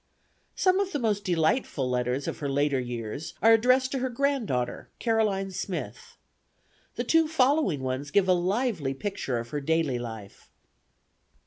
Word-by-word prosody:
Some 370 Hz, 0 st, +3 dB
of 390 Hz, -1 st, -1 dB
the -, -, +1 dB
most 215 Hz, -5 st, 0 dB
delightful 165 Hz, -, +1 dB
letters 125 Hz, +2 st, -1 dB
of -, -, -4 dB
her 145 Hz, -, -2 dB
later 140 Hz, 0 st, +1 dB
years 125 Hz, +6 st, -5 dB
are 225 Hz, +2 st, +6 dB
addressed 255 Hz, +3 st, +3 dB
to 270 Hz, -, -1 dB
her 260 Hz, +1 st, -1 dB
granddaughter, 240 Hz, -, -1 dB
Caroline 210 Hz, -4 st, 0 dB
Smith. 185 Hz, 0 st, -6 dB, 0.8 s
The -, -, -2 dB
two 325 Hz, -1 st, +3 dB
following 280 Hz, -, +2 dB
ones 130 Hz, +2 st, -3 dB
give 190 Hz, +6 st, +3 dB
a 185 Hz, -, +5 dB
lively 180 Hz, -, 0 dB
picture 165 Hz, -, -3 dB
of 115 Hz, 0 st, -5 dB
her 145 Hz, +2 st, -3 dB
daily 155 Hz, -4 st, 0 dB
life. 110 Hz, -4 st, -9 dB
180 Hz, 150 wpm, -27 LUFS, -, 0.8 s, are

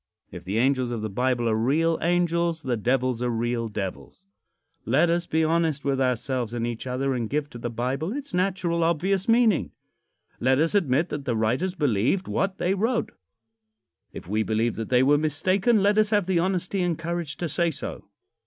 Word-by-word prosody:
If 90 Hz, -1 st, -9 dB
the 95 Hz, +4 st, -3 dB
angels 130 Hz, 0 st, +2 dB
of 115 Hz, -3 st, -4 dB
the 110 Hz, -, -3 dB
Bible 125 Hz, +2 st, 0 dB
are 110 Hz, -, +2 dB
real 155 Hz, +9 st, +1 dB
angels, 170 Hz, -1 st, +1 dB
the 125 Hz, -2 st, 0 dB
devils 125 Hz, +2 st, 0 dB
are 125 Hz, -, 0 dB
real 115 Hz, 0 st, -1 dB
devils. 105 Hz, -, -6 dB, 0.6 s
Let 155 Hz, +8 st, +3 dB
us 170 Hz, 0 st, 0 dB
be 160 Hz, 0 st, +1 dB
honest 160 Hz, -3 st, 0 dB
with 135 Hz, -1 st, 0 dB
ourselves 125 Hz, -1 st, -1 dB
and 115 Hz, -1 st, -1 dB
each 120 Hz, +1 st, -5 dB
other 135 Hz, +2 st, -1 dB
and 120 Hz, -3 st, -2 dB
give 145 Hz, 0 st, -2 dB
to 120 Hz, -, -9 dB
the 120 Hz, -, -3 dB
Bible 130 Hz, -, -2 dB
its 280 Hz, +2 st, -6 dB
natural, 180 Hz, -2 st, 0 dB
obvious 185 Hz, +5 st, 0 dB
meaning. 230 Hz, -6 st, +3 dB, 0.7 s
Let 130 Hz, +1 st, +3 dB
us 160 Hz, +5 st, +1 dB
admit 160 Hz, -4 st, +2 dB
that 145 Hz, -2 st, -5 dB
the 120 Hz, -4 st, 0 dB
writers 130 Hz, -, 0 dB
believed 145 Hz, -, +1 dB
what 195 Hz, 0 st, -1 dB
they 180 Hz, -, +1 dB
wrote. 225 Hz, +5 st, 0 dB, 1.0 s
If -, -, -10 dB
we 105 Hz, +3 st, 0 dB
believe 110 Hz, +1 st, 0 dB
that 115 Hz, -, -5 dB
they 125 Hz, 0 st, +4 dB
were 145 Hz, +2 st, +4 dB
mistaken, 185 Hz, -, +2 dB
let 205 Hz, +1 st, +3 dB
us 215 Hz, -1 st, +3 dB
have 205 Hz, -3 st, +2 dB
the 185 Hz, -2 st, +1 dB
honesty 185 Hz, +1 st, -1 dB
and 175 Hz, -3 st, 0 dB
courage 170 Hz, -2 st, -4 dB
to 175 Hz, -, -2 dB
say 170 Hz, +3 st, +1 dB
so. 160 Hz, -, -6 dB
145 Hz, 190 wpm, -25 LUFS, 120-175 Hz, 1.0 s, they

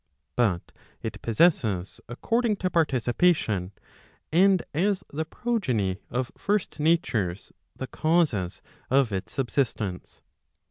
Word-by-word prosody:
But 100 Hz, -8 st, +1 dB, 0.3 s
it 110 Hz, -2 st, -5 dB
possesses 110 Hz, -, +2 dB
according 230 Hz, -, 0 dB
to 185 Hz, -2 st, -2 dB
participation, 125 Hz, -, +2 dB, 0.6 s
and 185 Hz, +2 st, +5 dB
as 185 Hz, +4 st, +1 dB
the 160 Hz, +2 st, -2 dB
progeny 125 Hz, -, -1 dB
of 125 Hz, 0 st, -2 dB
first 205 Hz, -5 st, -1 dB
natures 125 Hz, -, +1 dB, 0.2 s
the 130 Hz, -, -4 dB
causes 155 Hz, -, 0 dB, 0.3 s
of 130 Hz, -3 st, +3 dB
its 95 Hz, 0 st, -4 dB
subsist¬ 135 Hz, -1 st, 0 dB
ence. 95 Hz, -5 st, -6 dB
130 Hz, 105 wpm, -26 LUFS, 105-175 Hz, 0.6 s, and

